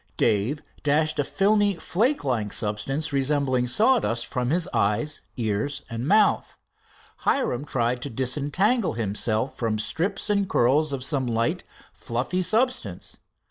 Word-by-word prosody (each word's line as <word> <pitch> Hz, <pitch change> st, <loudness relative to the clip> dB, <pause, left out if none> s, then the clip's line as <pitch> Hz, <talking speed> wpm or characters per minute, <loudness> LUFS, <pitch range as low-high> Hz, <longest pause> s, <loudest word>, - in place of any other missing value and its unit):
Dave 110 Hz, +8 st, +1 dB, 0.2 s
dashed 155 Hz, +1 st, +1 dB
a -, -, +3 dB
filmy, 205 Hz, +4 st, +2 dB
flake 230 Hz, -, 0 dB
like 110 Hz, -6 st, -1 dB
substance 135 Hz, +9 st, -1 dB
resembling 135 Hz, -2 st, +1 dB
sawdust 210 Hz, -, +2 dB
from 125 Hz, 0 st, -2 dB, 0.2 s
eyes, 105 Hz, +10 st, 0 dB, 0.2 s
ears 120 Hz, +5 st, -1 dB
and 115 Hz, +3 st, -3 dB
mouth. 210 Hz, +2 st, +3 dB, 0.6 s
Hiram 145 Hz, -, 0 dB
tried 120 Hz, -2 st, -1 dB
to 140 Hz, -, -4 dB
disentangle 145 Hz, -, +1 dB
himself 110 Hz, +2 st, -1 dB
from 115 Hz, -2 st, -1 dB
strips 165 Hz, -, -1 dB
and 200 Hz, -2 st, +1 dB
curls 140 Hz, +5 st, +2 dB
of 135 Hz, -2 st, -3 dB
some 135 Hz, -3 st, 0 dB
light, 115 Hz, 0 st, 0 dB, 0.3 s
fluffy 125 Hz, +10 st, -2 dB
substance. 220 Hz, -, 0 dB
135 Hz, 125 wpm, -25 LUFS, 115-175 Hz, 0.6 s, a